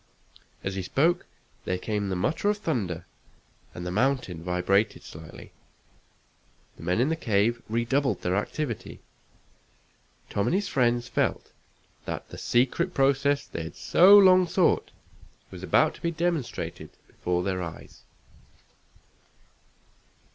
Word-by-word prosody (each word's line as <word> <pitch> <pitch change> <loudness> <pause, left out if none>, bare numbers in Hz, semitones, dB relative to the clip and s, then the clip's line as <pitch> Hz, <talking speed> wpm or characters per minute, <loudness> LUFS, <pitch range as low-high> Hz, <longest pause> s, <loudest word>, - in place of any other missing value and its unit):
As 95 - -2
he 95 - -3
spoke 165 - +1 0.4
there 90 - -1
came 105 +1 -2
the 95 - -1
mutter 155 - 0
of 210 - +1
thunder, 105 - -3 0.7
and 90 - -6
the 90 - -3
mountain 110 -6 0
vibrated 95 +4 +1
slightly. 80 0 -11 1.3
The - - -13
men 90 +6 0
in 130 +5 +2
the 160 - +1
cave 115 -4 +1
redoubled 120 0 0
their 90 +1 0
activity. 120 +4 -4 1.3
Tom 100 - 0
and - - +2
his 200 +1 0
friends 120 -2 +1
felt - - -1 0.5
that - - -5
the - - -9
secret 135 +9 +1
process 140 +1 +2
they - - -6
had 80 - -7
so 195 +4 +6
long 185 -2 +6
sought 180 +1 +2 0.6
was - - -9
about - - +3
to - - -16
be 170 - 0
demonstrated 170 -4 -3 0.2
before 90 0 -2
their 95 -1 -2
eyes. 80 -2 -9
120 Hz, 130 wpm, -27 LUFS, -, 1.3 s, so